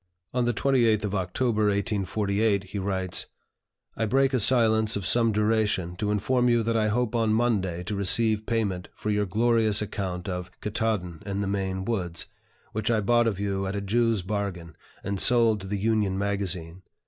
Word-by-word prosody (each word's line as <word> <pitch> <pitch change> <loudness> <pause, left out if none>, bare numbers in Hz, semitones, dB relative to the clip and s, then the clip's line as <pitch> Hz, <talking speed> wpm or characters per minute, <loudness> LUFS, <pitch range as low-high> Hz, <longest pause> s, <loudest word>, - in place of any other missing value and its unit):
On 125 -1 +1
the 120 - +2
28th 115 -4 +2
of 105 -1 -2
October, 105 +4 0
1848, 100 0 0
he 100 +1 -6
writes: 95 -1 -1 0.7
"I 110 - -1
break 135 +3 +2
a 130 - +3
silence 110 -2 +4
of 100 -3 -3
some 115 -1 +3
duration 105 -4 0
to 105 +2 -2
inform 125 +4 +1
you 120 -1 +3
that 115 +1 0
I 110 -1 +2
hope 120 +2 0
on 110 -2 +2
Monday 95 -7 0
to 105 - -4
receive 110 +2 +1
payment 100 -6 -1
for 105 - -3
your 105 -1 0
glorious 110 +1 +2
account 95 -4 -4
of 90 -1 -4
'Ktaadn 105 -5 -2
and 100 0 -2
the - - -2
Maine 95 -1 -2
Woods,' 90 -7 -3 0.5
which 110 +1 -2
I 115 -2 +2
bought 120 +3 +3
of 100 -4 -1
you 95 -1 -2
at 95 - -3
a 100 - -2
Jew's 115 0 +1
bargain, 95 -4 -4 0.3
and 100 -1 -3
sold 115 -4 +3
to 95 - -8
the 100 +1 -2
'Union 105 -2 0
Magazine.' 95 -4 -2
105 Hz, 180 wpm, -26 LUFS, 95-115 Hz, 0.7 s, silence